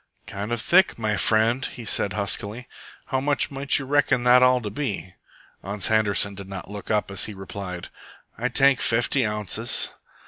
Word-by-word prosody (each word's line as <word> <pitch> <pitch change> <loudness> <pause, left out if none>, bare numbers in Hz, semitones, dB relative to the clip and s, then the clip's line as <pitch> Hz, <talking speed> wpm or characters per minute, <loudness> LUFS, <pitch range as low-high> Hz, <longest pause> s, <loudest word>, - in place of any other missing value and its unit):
"Kind 100 +3 -6
of 120 - -1
thick, 190 - +3
my 110 -2 -1
friend," 115 +5 +2
he 120 - -6
said 105 -1 0
huskily. 105 +3 -2 0.4
"How 130 -1 0
much 145 0 +1
might 140 0 +2
you 135 - -4
reckon 135 -2 +2
that 125 +1 +6
all 125 0 +5
to 105 -3 -5
be?" 105 -7 -4 0.5
Ans 100 0 -2
Handerson 105 -2 +2
did 100 -1 -9
not 95 0 -8
look 105 -1 -8
up 105 -2 0
as 100 - 0
he 105 - -8
replied, 95 -2 -7 0.5
"Ay 125 +2 -2
tank 135 +1 +4
fafty 120 +3 +2
ounces." 105 +2 -1
110 Hz, 175 wpm, -24 LUFS, 100-125 Hz, 0.5 s, that